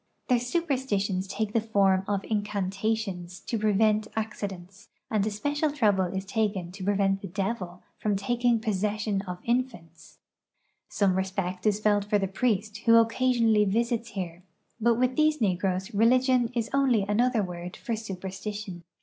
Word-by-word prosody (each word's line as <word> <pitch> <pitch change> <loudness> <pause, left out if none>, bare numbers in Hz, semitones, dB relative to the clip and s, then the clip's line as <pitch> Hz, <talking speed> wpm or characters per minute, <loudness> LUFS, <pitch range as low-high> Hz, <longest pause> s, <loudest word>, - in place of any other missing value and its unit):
Their 250 -1 +4
superstitions 245 - -1
take 215 +1 -3
the 230 - +2
form 195 -4 +2
of 200 -1 -1
incantations 200 -2 -2
to 230 - -3
prevent 215 0 +2
acci 215 -2 -3
dents, 190 +1 -12 0.2
and 215 -3 +2
especial 290 +9 -1
trouble 210 -9 +2
is 190 +2 -4
taken 195 -4 -1
to 190 +1 -8
prevent 195 0 +1
the 195 - -6
devil 185 -1 -4 0.2
from 210 -1 0
taking 235 +4 +1
possession 210 -1 -1
of 180 0 -4
infants. 225 -10 -3 0.7
Some 200 -3 +2
respect 190 0 -2
is 210 -1 +2
felt 205 -1 +2
for 210 0 +2
the 195 -1 0
priest 210 +1 -1
who 230 +2 +4
occasionally 230 -1 +4
visits 230 +3 0
here, 175 -2 -4 0.4
but 235 +1 +3
with 255 +2 +1
these 310 0 +3
negroes 190 0 0
religion 250 +3 +3
is 230 -1 -1
only 265 -6 +3
another 225 +3 +2
word 180 0 -6
for 230 - -3
superstition. 195 -1 -6
210 Hz, 150 wpm, -27 LUFS, 190-230 Hz, 0.7 s, Their